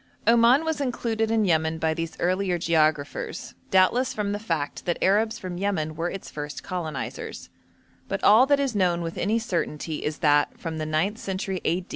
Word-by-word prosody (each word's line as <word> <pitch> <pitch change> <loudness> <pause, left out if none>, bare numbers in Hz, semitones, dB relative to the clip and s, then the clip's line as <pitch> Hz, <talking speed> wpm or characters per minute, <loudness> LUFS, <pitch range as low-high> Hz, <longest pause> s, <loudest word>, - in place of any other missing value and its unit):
Oman 235 +6 +5
was 320 -2 -1
included 230 -4 -1
in 220 -1 +2
Yemen 160 -2 +1
by 160 0 0
these 165 0 -5
earlier 185 0 +1
geographers, 155 -3 0 0.2
doubtless 190 +7 +3
from 205 -1 -1
the 205 - -2
fact 165 -9 -3
that 175 - 0
Arabs 220 +3 +2
from 180 -1 -6
Yemen 165 -6 -1
were 170 +2 -2
its 195 - -7
first 145 0 -6
colonisers; 165 -7 -5 0.6
but - - -3
all 225 +6 +7
that 285 0 +4
is 270 -5 -1
known 175 -3 +1
with 165 0 -5
any 215 +4 +1
certainty 170 -8 -3
is 150 0 -2
that, 145 -3 +2
from 160 -2 -5
the 155 - -3
ninth 175 +8 0
century 190 -1 -3
a. 175 +3 0
185 Hz, 180 wpm, -25 LUFS, 160-220 Hz, 0.6 s, all